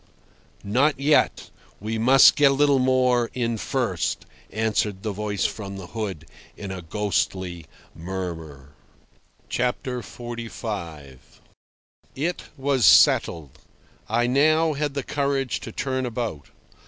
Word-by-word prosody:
"Not 130 +8 +1
yet. 145 +2 +2 0.3
We 110 +2 -3
must 130 +4 +7
get 145 -1 +5
a - - +2
little 140 -1 +3
more 125 -2 +2
in 120 -2 -1
first," - - -2 0.3
answered 110 -3 -1
the 110 - -2
voice 105 0 -2
from 100 -2 -4
the 95 - -8
hood 100 -8 -4 0.3
in 100 -2 -6
a 95 -1 -6
ghostly 95 -1 -2 0.3
murmur. 80 -5 -6 0.8
XLV. 115 - -4 1.0
It 170 +6 -2
was 135 -2 0
settled. 80 -7 +4 0.5
I 115 +2 +2
had 120 - 0
now 155 +4 +3
the 145 -1 -2
courage 140 -2 -1
to 115 - -8
turn 130 +1 -2
about. 115 - -4
115 Hz, 115 wpm, -24 LUFS, 95-130 Hz, 1.0 s, must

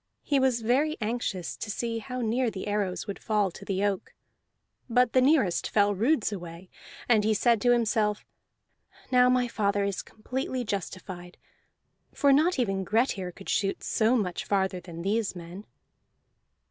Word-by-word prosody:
He 285 -2 +2
was 255 -3 +1
very 285 +7 +2
anxious 210 -5 -3
to 215 - -6
see 230 +2 -2
how 250 +3 -5
near 240 +2 +1
the 195 -3 -6
arrows 205 -3 -1
would 200 -2 -6
fall 210 -4 0
to 190 - -11
the 195 0 -2
oak; 200 -2 -2 0.7
but 250 0 +3
the 255 - +5
nearest 260 - +2
fell 205 -1 +3
roods 230 +4 +1
away, 175 -2 -8 0.4
and 220 -4 +4
he 215 0 +2
said 230 0 +3
to 245 - +4
himself, 215 -3 +1 0.9
"Now 250 0 +5
my 250 -1 +2
father 200 -3 0
is 200 -1 -2
completely 255 +3 -4
justified, 185 -3 -6 0.8
for 280 -1 +4
not 320 +5 +3
even 195 -6 0
Grettir 205 -3 0
could 195 +2 -13
shoot 195 -1 0
so 225 +3 +2
much 180 -6 -2
farther 190 -2 0
than 170 -1 -9
these 210 +1 0
men." 175 +4 -9
210 Hz, 160 wpm, -27 LUFS, 195-245 Hz, 0.9 s, the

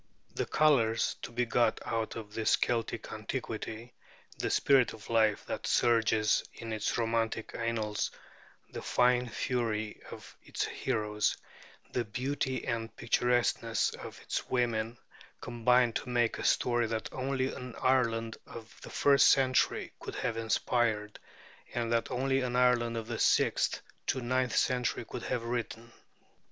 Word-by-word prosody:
The - - -2
colors 125 -7 +3
to - - -6
be 125 +1 0
got 115 -1 +2
out 115 -1 -2
of 105 -2 -8
this 110 -1 +3
Celtic 115 -2 -2
antiquity, 115 +2 -5 0.4
the - - -2
spirit 135 -3 +4
of 110 - -10
life 110 -2 +3
that - - -4
surges 110 -2 +3
in 115 -1 -6
its 110 -1 -1
romantic 115 -1 -1
annals, 110 -2 -1 0.6
the - - -6
fine 125 0 +2
fury 110 -3 -2
of - - -11
its - - -3
heroes, 105 0 -1 0.5
the 125 - 0
beauty 130 +3 -2
and 115 -1 -3
picturesqueness 120 -1 +1
of - - -9
its - - -3
women, 120 -2 0 0.4
combine 125 0 +2
to 125 - -4
make 120 -2 +1
a - - -4
story 120 -1 +2
that 110 0 -3
only 130 0 -1
an 125 -2 -8
Ireland 115 -3 +1
of 115 -1 -11
the - - -9
first 140 -1 +5
century 130 -1 +2
could - - -7
have 115 - -2
inspired, 110 -1 0 0.6
and 120 -1 0
that 115 - +1
only 135 +1 +1
an 125 -1 -2
Ireland 120 -2 +3
of 115 - -4
the - - -4
sixth - - +2 0.2
to - - +1
the 125 - -4
ninth 125 -1 +1
century 125 -2 +1
could - - -6
have 120 - -2
written. 115 -1 -4
115 Hz, 145 wpm, -31 LUFS, 115-125 Hz, 0.6 s, first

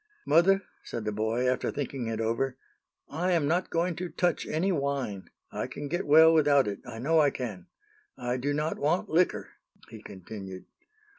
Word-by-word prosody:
"Mother," 195 +4 +4 0.2
said 115 -2 -6
the 105 - -1
boy, 110 +4 0
after 125 - 0
thinking 135 -4 -4
it 110 -1 -3
over, 115 +4 -1 0.5
"I 175 +5 -1
am 160 -4 +2
not 175 +4 0
going 170 +1 0
to 180 0 -4
touch 175 0 0
any 175 +6 0
wine. 140 - -2 0.2
I - - -3
can 145 - -6
get 175 +2 -2
well 160 +2 +7
without 145 -5 +4
it, 100 -1 -3
I 115 -2 -7
know 155 +7 +2
I 145 -2 +5
can. 110 -10 -6 0.5
I 125 0 -2
do 140 +3 -1
not 150 +2 -1
want 155 +5 0
liquor," 175 +3 +1 0.4
he - - -11
continued. 95 -1 -9
140 Hz, 175 wpm, -28 LUFS, 115-165 Hz, 0.5 s, well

